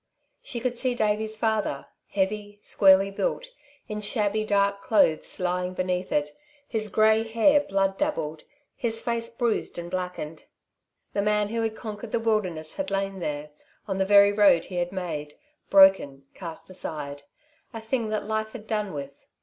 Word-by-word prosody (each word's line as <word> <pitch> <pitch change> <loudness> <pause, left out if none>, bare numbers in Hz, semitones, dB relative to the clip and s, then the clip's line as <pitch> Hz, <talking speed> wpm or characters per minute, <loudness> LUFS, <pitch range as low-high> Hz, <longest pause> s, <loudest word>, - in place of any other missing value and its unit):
She 245 - -5
could 245 0 -2
see 255 -2 0
Davey's 215 0 0
father, 220 -10 0 0.2
heavy, 205 +1 -2
squarely 195 0 +5
built, - - -2 0.4
in 210 0 -4
shabby, 210 0 0
dark 200 -1 +1
clothes, 195 -8 +2
lying 180 0 -1
beneath 185 0 -2
it, 150 0 0 0.3
his 215 -2 -2
grey 220 +2 +4
hair 230 +6 +4
blood 195 -6 0
dabbled, 160 - -2 0.3
his 225 -2 -2
face 230 0 -2
bruised 235 -1 -1
and 175 0 -6
blackened. 180 -4 -5 0.7
The 200 - +1
man 210 0 +1
who 230 +1 -1
had 225 -1 -1
conquered 220 0 -7
the - - +1
wilderness 185 -9 -1
had 290 -1 -2
lain 195 0 -2
there, 150 -2 -4 0.4
on 195 -1 -2
the - - +4
very 200 0 +7
road 200 -5 +5
he 180 - -6
had 175 0 -1
made, 155 -6 -5 0.3
broken, 190 -9 +5
cast 170 +1 -8
aside 145 -5 -5 0.5
a 225 - -6
thing 225 0 -2
that 215 -1 -2
life 220 0 -2
had 220 -3 -8
done 210 -3 -2
with. 140 -1 -8
205 Hz, 160 wpm, -26 LUFS, 180-220 Hz, 0.7 s, very